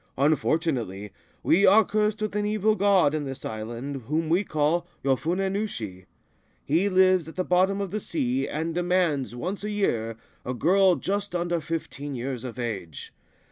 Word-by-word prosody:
Unfortunately, 130 - 0 0.3
we 180 +5 +4
are 210 +2 +7
cursed 215 +1 0
with 210 -1 -3
an 210 - +1
evil 215 +1 +2
god 195 -7 +3
in 155 -1 -1
this 135 -1 -7
island, 120 +4 -5
whom 155 +2 -1
we 175 +5 +3
call 160 +1 0 0.2
Yofune 170 +8 +1
Nushi. 110 - -4 0.6
He 170 +8 +2
lives 185 -3 +4
at - - -12
the 185 - 0
bottom 185 +2 +2
of 200 -3 -3
the 215 - -2
sea, 135 -7 -1
and 160 +2 -3
demands, 175 - 0
once 185 +11 -4
a 210 - -2
year, 115 - -1 0.3
a 125 - -3
girl 185 - +4
just 200 0 -3
under 175 -1 0
fifteen 150 -3 -5
years 125 0 -4
of 125 -2 -7
age. 100 - -5
165 Hz, 165 wpm, -26 LUFS, 130-195 Hz, 0.6 s, are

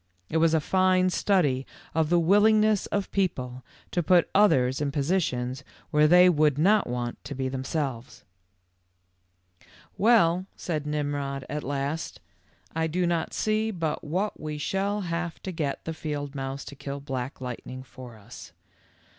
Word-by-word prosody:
It 160 - 0
was 165 0 +4
a - - +4
fine 185 +2 +2
study 155 -11 +2 0.3
of 160 -1 +1
the 175 - +4
willingness 210 +4 +4
of 200 -1 -2
people 130 -10 -2 0.3
to 175 - +1
put 175 +1 +3
others 135 -10 +4
in 145 -1 0
positions 140 -4 -1 0.3
where 150 0 +5
they 180 +3 +7
would 150 -5 +3
not 200 +7 +3
want 120 -1 -4
to 140 0 -6
be 130 0 -2
themselves.:? 130 -3 -4 1.8
Well," 190 -5 +4
said 155 -5 -3
Nimrod 145 -2 -2
at 150 0 -4
last, 140 +3 -3 0.6
r 160 0 +1
'Ido 175 +3 0
not 170 -2 -1
see 215 +1 0
but 165 -7 -3
what 185 +7 -2
we 150 -1 -5
shall 195 +6 -1
have 170 -2 -3
to 190 - -4
get 150 -5 -3
the 160 - -3
field 145 -3 -4
mouse 135 0 -5
to 140 - -9
kill 140 +1 -6
Black 130 -1 -5
Lightning; 130 0 -7
for 125 -3 -12
us. 100 - -12
155 Hz, 150 wpm, -27 LUFS, 135-180 Hz, 1.8 s, they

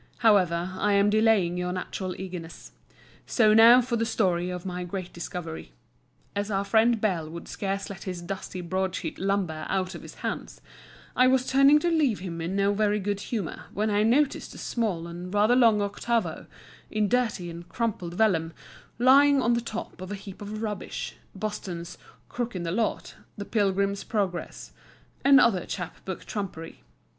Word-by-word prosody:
However, 180 -4 +4
I 205 0 +2
am 200 +1 +4
delaying 215 -5 +3
your 180 0 -2
natural 185 0 -4
eagerness. 180 -3 -8 0.6
So 215 -3 +4
now 230 +3 +8
for 240 -1 -2
the 230 - 0
story 180 -6 +1
of 180 0 -5
my 180 -1 -4
great 180 0 -6
discovery. 165 - -6 0.6
As 205 +1 -2
our 195 -1 0
friend 225 +3 +3
Bell 180 -7 -1
would 170 +1 -8
scarce 195 0 -3
let 195 -2 -9
his 180 -2 -5
dusty 185 0 -5
broadsheet 185 -1 -3
lumber 190 -5 -1
out 185 -1 -1
of - - -8
his - - -11
hands, - - -5 0.6
I 255 - +5
was 260 0 +3
turning 275 +3 +6
to 345 - +1
leave 290 -10 +2
him 170 -2 -6
in 170 +4 -3
no 200 0 +2
very 210 0 +1
good 200 0 -2
humour, 205 -5 -4
when 215 +1 0
I 205 0 +2
noticed 265 +6 +1
a - - -10
small 205 -9 -2
and 175 +1 -7
rather 210 +4 +4
long 225 -5 +5
octavo, 200 -3 -2 0.4
in 215 -1 +1
dirty 225 -7 0
and 170 +1 -10
crumpled 185 -5 -3
vellum, 165 -6 +2 0.4
lying 275 +3 +6
on 240 -2 +2
the 235 - +1
top 220 -5 -6
of 185 +1 -7
a - - -2
heap 195 0 -10
of 215 +2 -5
rubbish, 210 -3 -4 0.2
Boston's 185 -4 -5 0.3
"Crook 240 -3 -4
in 180 - -3
the 165 - -2
Lot," 220 +4 -1 0.2
"The 205 - -5
Pilgrim's 200 -2 0
Progress," 195 -6 -3 0.5
and 275 -1 +7
other 195 -7 +3
chap 180 - -6
book 190 -2 -6
trumpery. 185 -6 -6
200 Hz, 170 wpm, -27 LUFS, 180-225 Hz, 0.6 s, now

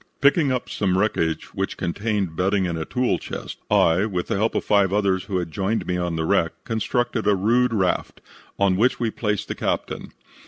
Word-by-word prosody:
"Picking 140 0 +4
up 125 -1 -1
some 95 -2 0
wreckage 85 -6 0
which - - -3
contained 100 -1 -2
bedding 95 +2 +1
and 85 -2 -2
a 80 -1 -3
tool 125 0 0
chest, - - -7
I, 85 +6 +4
with 90 -4 -3
the - - +1
help 110 +3 0
of - - -1
five 100 -2 +3
others 100 -2 +1
who 95 -3 -2
had 85 -2 -3
joined 100 +6 -1
me 90 - -1
on 90 -1 -1
the 80 0 -1
wreck, 80 0 +2
constructed 120 0 -1
a 105 - +5
rude 120 +6 +2
raft, 95 -5 0 0.4
on 100 -2 +2
which 120 +5 +2
we 115 -2 0
placed 105 -3 -2
the - - -3
captain. - - -3
100 Hz, 200 wpm, -23 LUFS, 90-110 Hz, 0.4 s, a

